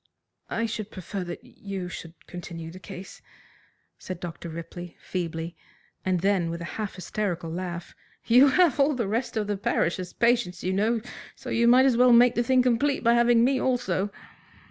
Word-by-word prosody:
"I 230 - -1
should 215 -2 -4
prefer 185 0 -5
that 175 - -7
you 195 -3 -6
should 165 -1 -8
continue 170 -2 -7
the 185 - -10
case," 185 0 -10 0.8
said 185 -2 -6
Dr. 170 -1 -7
Ripley 170 +1 -8
feebly, 165 -2 -4 0.5
and 185 -2 0
then, 190 -3 +2
with 170 0 -4
a 170 - -5 0.2
half 205 -3 -4
hysterical 180 -2 -3
laugh, 175 0 -5 0.3
"You 250 +4 +7
have 315 0 +4
all 280 +1 +4
the 235 -5 -1
rest 225 +3 -2
of 215 - 0
the 205 -1 -2
parish 185 -2 0
as 180 -1 -5
patients, 235 -7 +1
you 185 - 0
know, 220 +4 +1 0.3
so 255 - -8
you 235 +1 +3
may 255 +2 +7
as 255 -3 +3
well 250 0 +6
make 240 +1 +7
the 240 - +1
thing 255 +1 +3
complete 255 +3 +1
by 235 0 +5
having 235 0 +5
me 260 +1 +3
also." 205 -6 0
200 Hz, 185 wpm, -26 LUFS, 175-240 Hz, 0.8 s, You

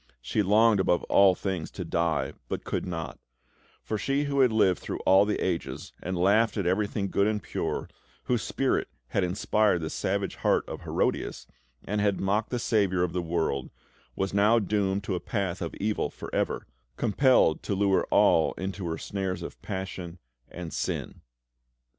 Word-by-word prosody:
She - - -1
longed 105 +2 +4
above 90 -2 +2
all 100 -2 +5
things 95 -5 -3
to - - -6
die, 80 -5 0 0.2
but - - -3
could - - -3
not; 80 -2 -5 0.6
for 110 - -3
she 140 +5 0
who 140 -1 -1
had 130 -3 +5
lived 95 -5 +3
through - - -5
all 95 +2 +5
the 105 - 0
ages, 85 -3 -3
and 90 0 -3
laughed 100 +5 +3
at 100 - -1
everything 100 +1 0
good 100 - +3
and 105 -1 0
pure, - - -3 0.4
whose 120 -3 0
spirit 135 -1 0 0.2
had 100 - +1
inspired 95 +1 +1
the 80 - -4
savage 100 +1 -2
heart - - +1
of - - -6
Herodias, - - -1 0.4
and 105 +1 -1
had 100 -2 +1
mocked 105 +3 0
the 125 - -1
Saviour 100 -6 +1
of 90 - -1
the 90 - 0
world, 80 -6 -1 0.5
was 95 0 -2
now 105 +3 +4
doomed 100 -2 0
to 100 - -2
a 90 - -1
path 95 0 -3
of 85 - -4
evil 105 +1 -1
for - - -10
ever, - - -1 0.3
compelled 120 - +3
to 100 - -2
lure 100 0 +2
all - - +4
into 95 -1 -4
her 80 -1 -2
snares 95 +1 -3
of - - -8
passion 95 -2 -5 0.3
and 85 -2 -7
sin. - - -3
95 Hz, 175 wpm, -27 LUFS, 90-105 Hz, 0.6 s, all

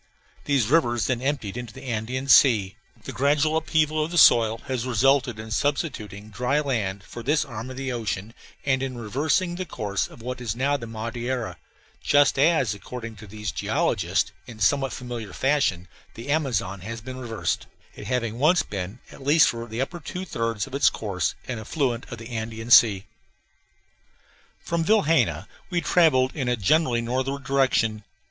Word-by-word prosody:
These 140 -5 +2
rivers 120 -8 +3
then 125 -2 -1
emptied 135 -7 -2
into 120 -3 -7
the - - -10
Andean 125 +2 -3
Sea. 110 -8 +5 0.3
The - - -6
gradual 145 +3 +2
upheaval 155 -1 +1
of 155 - -3
the 175 - -3
soil 115 -7 +6
has 130 -3 -2
resulted 130 0 +2
in 110 0 -8
substituting 110 - -2
dry 125 +7 0
land 105 -9 -2
for 120 - -9
this 150 +6 +1
arm 120 -2 -7
of 130 - -8
the 135 -1 -3
ocean 110 -3 -3 0.3
and 130 -2 +2
in 130 -2 -4
reversing 150 - 0
the 185 - -2
course 100 - -2
of 115 - -14
what 125 +1 -5
is 115 -3 -3
now 140 +4 +1
the 120 -5 -5
Madeira, 115 -2 -4 0.4
just 145 -1 +3
as, 140 -7 +3
according 115 +2 -8
to 105 +1 -11
these 105 0 -5
geologists, - - 0 0.2
in 115 -3 -11
somewhat 135 +6 +2
familiar 120 -6 -6
fashion 135 -11 +1 0.3
the 115 +5 -5
Amazon 115 -10 0
has 115 +3 -6
been 130 +3 -8
reversed, 115 -3 -3 0.3
it - - -9
having 120 -2 -2
once 165 +6 +4
been, 95 +2 -5
at - - -13
least 150 +4 +5
for 115 0 -5
the 115 +2 -4
upper 175 +6 -3
two 180 +5 -6
thirds 115 - -2
of 135 - -14
its 140 +1 +4
course, 90 -7 -2
an 120 -3 -4
affluent 120 +1 -2
of 120 - -5
the 115 +1 -10
Andean 115 0 -5
Sea. 105 -5 +7 1.6
From 170 -1 -1
Vilhena 165 -5 +2 0.2
we 175 -2 0
travelled 145 -8 +3
in 135 -5 -2
a 125 - +2
generally 120 - +2
northward 130 +4 -2
direction. 130 -6 +1
125 Hz, 170 wpm, -25 LUFS, 110-140 Hz, 1.6 s, Sea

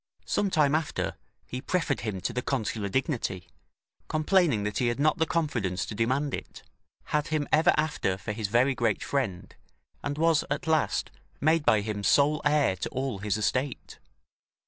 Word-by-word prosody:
Some 200 - +1
time 150 -5 +3
after, 155 0 -1 0.3
he 125 - -6
preferred 180 - 0
him 100 -3 -4
to - - -2
the 125 - -1
consular 110 -6 -2
dignity, 120 - -2 0.6
complaining 155 - +2
that 105 0 -2
he 125 - +2
had 120 +2 -1
not 155 +2 +2
the 160 - +2
confidence 115 - -1
to - - -6
demand 130 +6 0
it; - - -7 0.4
had 150 0 -1
him 155 -2 -1
ever 155 +1 +5
after 150 -11 0
for 105 - -5
his 105 -1 -2
very 120 +6 +3
great 115 -5 0
friend, 100 -9 -2 0.5
and 145 0 -3
was, 165 -1 +3
at 145 +1 -2
last, 160 -1 +1 0.3
made 160 +1 +3
by 110 - +5
him 105 -1 -4
sole 145 +6 +4
heir 145 -9 +3
to - - -3
all 130 -5 -3
his 105 0 -1
estate. 130 +6 -2
135 Hz, 170 wpm, -28 LUFS, 105-150 Hz, 0.6 s, ever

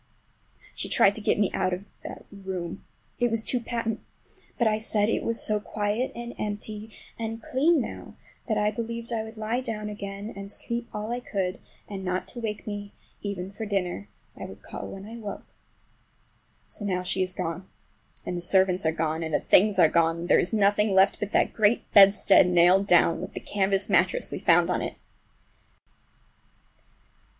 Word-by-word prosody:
She - - -4
tried 200 - +5
to 215 - -5
get - - +2
me 205 -2 +2
out 185 -1 0
of 190 +3 -11 0.2
the - - -8
room—it 190 +4 -5
was 225 -1 0
too 250 - +1
patent! 230 -2 -3 0.6
But 235 - +2
I 215 0 +1
said 215 -1 +2
it - - 0
was 230 0 -1
so 215 -1 +2
quiet 210 +4 -2
and 235 0 -6
empty 210 +1 -4 0.3
and 225 0 -3
clean 295 +8 +2
now 245 - -6 0.3
that 220 -3 0
I 210 0 +2
believed 230 +1 -5
I 220 -1 -1
would 220 +1 -10
lie 220 +3 -1
down 215 -4 -4
again 200 +1 -6
and 200 0 -7
sleep 235 +2 -4
all 210 +2 -4
I 240 - -1
could; 190 -6 -3 0.3
and 195 -2 -6
not 185 0 -2
to 240 - -5
wake 215 -2 -4
me 205 -1 -6 0.3
even 195 -2 -4
for 220 +2 -6
dinner—I 195 -1 -4
would - - -11
call - - -7
when 195 0 -8
I 225 +2 -8
woke. 210 -3 -7 1.2
So - - -7
now 180 -3 -1
she 190 +1 0
is 185 -1 -1
gone, 170 +3 -4 0.6
and 180 - -3
the 175 - -3
servants 185 -1 +2
are - - +3
gone, 160 0 -1
and 160 -2 -1
the - - +3
things 205 +1 +4
are 175 - +7
gone, 165 +1 +2
and 175 - -5
there - - +6
is 180 - 0
nothing 205 -1 +3
left 190 +1 +4
but 210 0 -3
that - - +2
great 220 +1 +3
bedstead 195 -1 +7
nailed 180 +3 +5
down, 175 -2 +4
with - - -7
the - - -3
canvas 195 -1 0
mattress - - +2
we - - -4
found - - +4
on - - 0
it. - - -4
205 Hz, 185 wpm, -26 LUFS, 190-220 Hz, 1.2 s, are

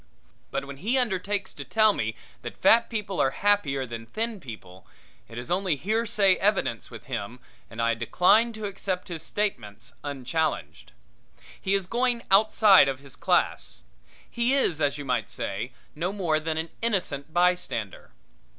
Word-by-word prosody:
But 135 - -3
when 140 0 -9
he 225 - 0
undertakes 200 -4 -1
to 140 - -7
tell 215 - +3
me 110 - -2 0.3
that 120 - -7
fat 230 +1 +5
people 210 -4 -3
are 135 - +3
happier 145 -6 +1
than 115 -1 -8
thin 225 - -3
people, 95 - -11 0.4
it 115 - -11
is 120 +4 -6
only 185 -2 +1
hearsay 210 - +2
evidence 195 - 0
with - - -10
him 110 +5 -5 0.3
and 110 - -10 0.2
decline 215 +6 +4
to 215 -1 -6
accept 195 -1 -4
his 165 -3 -5
statements 120 - -3
unchallenged. 140 - -3 0.7
He 195 +1 +1
is 195 -2 0
going 240 +3 0
outside 200 -4 +6
of 135 - -3
his 140 -1 -10
class. - - 0 0.4
He 240 +3 +1
is, 170 - +1
as 145 0 +1
you 145 - -6
might 125 -5 -1
say, 105 +6 -4 0.2
no 170 +5 -2
more 175 -6 0
than 160 0 -2
an 160 0 -3
innocent 180 -10 -1
bystander. 175 - 0
175 Hz, 155 wpm, -26 LUFS, 135-205 Hz, 0.7 s, outside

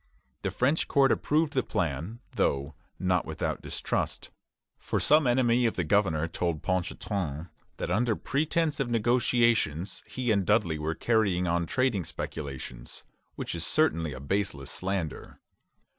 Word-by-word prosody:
The - - -1
French 140 +6 +1
court 140 -3 +4
approved 155 0 +1
the 130 - +2
plan, 85 - -3
though 70 +2 0 0.2
not 90 -2 +1
without - - -3
distrust; - - -2 0.5
for - - -1
some 150 -2 +4
enemy 120 -1 +3
of 115 - -2
the 90 - 0
governor 80 -3 +2
told 85 -2 -2
Ponchartrain 90 -3 -2 0.3
that - - -3
under 110 +3 +2
pretence 155 +4 0
of 135 -3 0
negotiations 115 -6 +2
he 125 -2 -1
and 100 -2 +3
Dudley 90 -6 +2
were 80 +1 -2
carrying 100 -6 +2
on 85 -1 0
trading 125 -6 +1
speculations, 70 -6 -6 0.3
which - - -4
is 85 -1 -3
certainly 85 - +1
a 65 - -7
baseless 75 -2 -2
slander. 95 -5 -4
95 Hz, 140 wpm, -28 LUFS, 80-120 Hz, 0.5 s, court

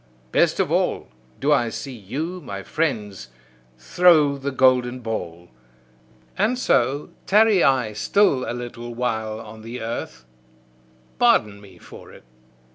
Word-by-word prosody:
Best - - +2
of - - 0
all, - - 0 0.3
do 145 +2 +1
I 120 -5 +3
see 135 +3 -7
you, 145 - -5
my 100 -7 -7
friends, 105 - -3 0.5
throw 150 - +4
the 140 0 -4
golden 130 -2 +2
ball! 90 -7 -6 0.9
And 220 +5 +1
so 140 - +1 0.2
tarry 210 -2 +4
I 125 -5 +2
still 135 - +2
a - - -2
little 120 -1 -7
while 110 -3 -2
on 110 0 -11
the 115 +3 -7
earth 110 - -6 0.9
pardon 100 -1 +3
me 95 -3 -16
for - - -14
it! - - -16
125 Hz, 130 wpm, -22 LUFS, 110-145 Hz, 0.9 s, throw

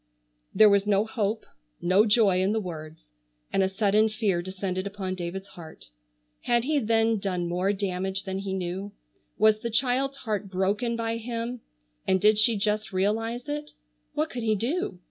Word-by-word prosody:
There 215 - +7
was 200 0 +3
no 205 0 +3
hope, 220 -1 -2 0.3
no 190 +5 +4
joy 205 -4 +4
in 195 +3 +2
the 220 - +1
words, 155 - -8 0.4
and - - +3
a 190 - +2
sudden 210 +2 +3
fear 210 -5 0
descended 185 +1 -3
upon 195 -2 -4
David's 185 +2 -5
heart. 160 - -12 0.5
Had 240 -1 +2
he 295 +2 +1
then 225 -2 +2
done 180 -3 -2
more 180 +3 +1
damage 190 -1 -2
than 190 0 -3
he 195 -1 -3
knew? 190 +2 -4 0.4
Was 215 0 +4
the 235 - -3
child's 265 +4 0
heart 215 -5 -3
broken 200 +6 0
by 230 0 -2
him, 235 +1 -4 0.5
and 190 - +3
did 210 +2 +4
she 230 +1 +4
just 210 +1 -1
realize 225 +6 -1
it? 295 0 -4 0.4
What 155 - 0
could 245 - -4
he 220 -1 +2
do? 235 - -2
205 Hz, 170 wpm, -27 LUFS, 190-225 Hz, 0.5 s, There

